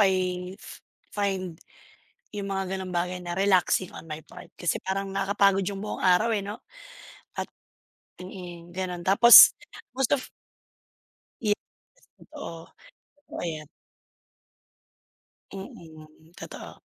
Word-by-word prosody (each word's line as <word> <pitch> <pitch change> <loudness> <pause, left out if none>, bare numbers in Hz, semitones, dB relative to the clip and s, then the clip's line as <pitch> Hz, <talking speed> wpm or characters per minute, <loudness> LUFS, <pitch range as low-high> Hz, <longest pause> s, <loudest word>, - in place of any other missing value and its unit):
I 185 -1 +1 0.6
find 190 -4 -2 0.7
yung 200 -1 -4
mga 190 -1 -2
ganong 190 -1 -5
bagay 180 +1 -2
na 175 +1 -4
relaxing 190 -2 +2
on - - -9
my 155 - -4
part - - -13
kasi 175 -3 -1
parang 195 0 -3
nakapagod 195 0 +3
yung 195 +1 -3
buong 210 +2 -5
araw, 195 +5 +4
eh, 205 - -1
'no, 205 +2 -6 0.8
at - - -1 0.8
mm, 175 -2 -9
gano'n. 180 -1 -4
Tapos 200 +6 +10 0.4
most 265 +1 +2
of 270 - -3 1.2
Yes, 210 -2 +3 0.6
totoo. 165 -1 -10 0.6
Oo, - - -6
ayan. 155 -3 -4 1.9
Mm, 160 -4 -12
totoo. - - -10
190 Hz, 110 wpm, -26 LUFS, 175-200 Hz, 1.9 s, Tapos